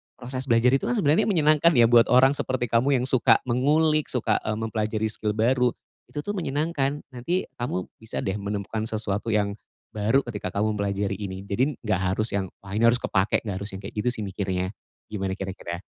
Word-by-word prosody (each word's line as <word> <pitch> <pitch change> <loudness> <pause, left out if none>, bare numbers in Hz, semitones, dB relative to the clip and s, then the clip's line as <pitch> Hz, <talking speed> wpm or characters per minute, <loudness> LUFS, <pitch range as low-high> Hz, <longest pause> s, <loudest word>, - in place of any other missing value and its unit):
proses 130 +1 -5
belajar 120 0 +4
itu 135 - +1
kan 245 - +1
sebenarnya 155 -8 +3
menyenangkan 160 -3 +4
ya 120 -1 +5
buat 120 -1 +6
orang 130 +2 +6
seperti 130 -4 -2
kamu 130 +4 +3
yang - - -1
suka 120 -2 +4
mengulik, 150 +5 +2
suka, 115 -4 +1
eee, 110 - 0
mempelajari 110 -1 -1
skill 105 0 -2
baru, 125 +3 +2 0.3
itu 145 - -5
tuh 205 - -4
menyenangkan. 145 -3 -1
Nanti, 150 +9 -2
kamu 90 -7 -3
bisa 110 0 -5
deh 95 0 -2
menemukan 100 +2 -3
sesuatu 105 -1 -2
yang 100 -1 0 0.3
baru, 110 +6 +2
ketika 105 -6 -5
kamu 105 +1 0
mempelajari 100 -1 -1
ini. 95 -2 -5
Jadi, 130 +9 +1
enggak 105 -5 0
harus 110 +3 -1
yang, 100 -1 -1 0.2
"Wah, 100 +1 -5
ini 115 - +3
harus 120 +1 +4
kepakai," 95 0 +1
enggak 100 -4 -4
harus 100 - -3
yang 95 - -7
kayak 100 - -9
gitu 105 +3 -1
sih 110 - -4
mikirnya, 95 -2 -2 0.4
gimana 95 -3 -3
kira-kira? 95 -3 -6
110 Hz, 190 wpm, -25 LUFS, 100-130 Hz, 0.4 s, buat